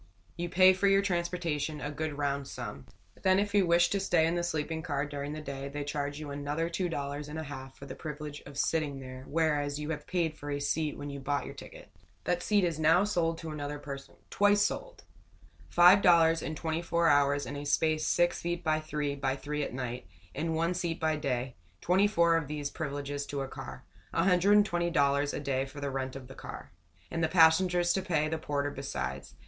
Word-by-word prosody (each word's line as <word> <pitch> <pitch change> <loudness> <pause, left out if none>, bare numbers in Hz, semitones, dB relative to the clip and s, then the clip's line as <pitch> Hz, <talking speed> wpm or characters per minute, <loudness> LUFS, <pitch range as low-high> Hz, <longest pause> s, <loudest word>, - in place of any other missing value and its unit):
You 175 0 -3
pay 185 +2 +7
for 190 +2 +1
your 195 0 +4
transportation, 170 -5 -1
a 145 +1 -4
good 150 0 -4
round 140 -1 -1
sum. 70 0 -7 0.3
Then 185 0 +4
if 200 0 0
you 200 -3 +4
wish 170 0 +4
to 200 - +1
stay 175 -4 +3
in 165 - +1
the 175 - 0
sleeping 160 -1 -2
car 145 -4 -1
during 145 0 -5
the 155 - -5
day, 140 -1 -5
they 145 +1 -4
charge 145 0 -3
you 150 -2 -6
another 145 +4 -2
two 180 +1 -1
dollars 145 -1 -4
and 150 +2 -6
a 160 - -3
half 135 -2 -8
for 140 - -10
the 135 - -7
privilege 150 -1 -7
of 140 -1 -10
sitting 145 -2 0
there, 130 0 -9
whereas 150 -2 0
you 150 +1 -3
have 150 -2 -5
paid 170 -4 0
for 145 -1 -8
a 145 0 -1
seat 150 +1 -1
when 145 0 -6
you 140 - -6
bought 140 +1 -1
your - - -7
ticket. - - -11 0.4
That 175 0 0
seat 205 -2 +2
is 170 -3 0
now 160 +4 +5
sold 170 -5 0
to 165 -1 -6
another 145 -1 -4
person 140 -1 -8 0.2
twice 205 0 +4
sold! - - -3 0.7
Five 180 +3 +7
dollars 165 -2 +5
for - - -4
twenty 160 +1 -2
four 170 0 +1
hours 145 -1 +3
in 135 +4 -6
a 145 - -5
space 155 +2 +1
six 175 0 +2
feet 175 0 -3
by 155 -1 +2
three 150 -2 -2
by 135 -1 -1
three 150 +2 -4
at - - -3
night, 125 -1 -5 0.3
and 160 +2 -2
one 165 +2 +1
seat 175 -2 -2
by 160 -1 +1
day; 130 -4 -2 0.3
twenty 190 +4 +3
four 170 -5 +3
of 160 -3 -2
these 145 -1 -4
privileges 145 -2 -4
to 140 -1 -3
a 135 - -3
car 65 - -8 0.3
$120 175 -6 +3
a - - -2
day 135 -2 0
for 145 +2 -10
the 140 -1 -3
rent 130 -1 -3
of 135 -2 -8
the 135 - -10
car - - -9 0.4
and 165 - -1
the - - +4
passengers 175 +1 +4
to 190 - 0
pay 160 -5 0
the 160 +1 -2
porter 145 -1 -2
besides. 65 - -5
155 Hz, 215 wpm, -30 LUFS, 140-170 Hz, 0.7 s, pay